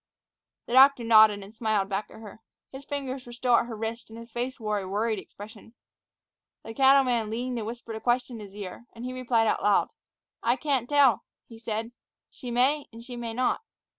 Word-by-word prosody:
The - - -6
doctor 265 -1 +7
nodded, 215 -3 +6
and 205 +3 -14
smiled 215 -3 0
back 195 +1 -3
at 220 - -13
her. 215 0 -12 0.3
His 265 +1 -10
fingers 270 -3 -5
were - - -9
still 245 0 +2
at 235 - 0
her 230 - -6
wrist, 225 +1 -5
and 225 - -11
his 230 0 -11
face 250 +3 -4
wore 210 -2 -1
a 190 - -6
worried 215 +2 -1
expression. 215 +4 -13 0.9
The 225 - -8
cattleman 260 -3 +4
leaned 245 +2 -3
and 215 - -5
whispered 235 -1 -7
a 220 - -7
question 245 -1 0
in 205 - -8
his 195 - -18
ear, 205 +3 -8
and 235 +1 -8
he 255 - -4
replied 245 -3 +1
out 215 - +1
loud. 205 -1 +3 0.5
"I 235 +2 +2
can't 270 -4 -1
tell," 280 -7 +4 0.2
he 225 -1 -13
said. 225 0 -4 0.4
"She 250 - -9
may 265 +5 +1
and 230 0 -11
she 245 0 -9
may 230 -1 -5
not." 255 - 0
235 Hz, 205 wpm, -27 LUFS, 220-255 Hz, 0.9 s, doctor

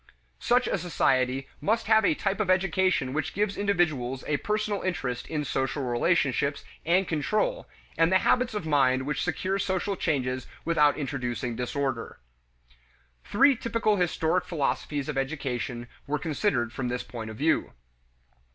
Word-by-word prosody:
Such 245 +1 +3
a - - 0
society 135 -6 +1
must 225 +3 +1
have 220 0 +5
a 160 - +3
type 195 +3 -1
of 210 -3 0
education 185 -6 +2
which 155 -1 -2
gives 205 0 0
individuals 155 -11 0
a 145 - +1
personal 210 +3 -1
interest 135 -9 -3
in 150 -2 -2
social 135 +1 -1
relationships 140 +2 +1 0.2
and 180 +3 +2
control, 215 - 0 0.3
and 165 +1 +4
the 190 - +6
habits 245 +3 +2
of 210 - -3
mind 130 -4 +2
which 145 -1 -1
secure 185 +3 -1
social 190 +1 -1
changes 130 -7 -1 0.2
without 150 -3 +3
introducing 125 -4 -3
disorder. 125 0 -3 1.1
Three 275 +7 +4
typical 225 -3 0
historic 175 0 +1
philosophies 145 -3 -2
of 145 -3 -1
education 130 -4 -3 0.2
were 150 +1 0
considered 145 - -1
from 130 - -3
this 125 0 -2
point 110 -2 -7
of 110 - -8
view. 160 +5 +1
155 Hz, 145 wpm, -27 LUFS, 130-190 Hz, 1.1 s, the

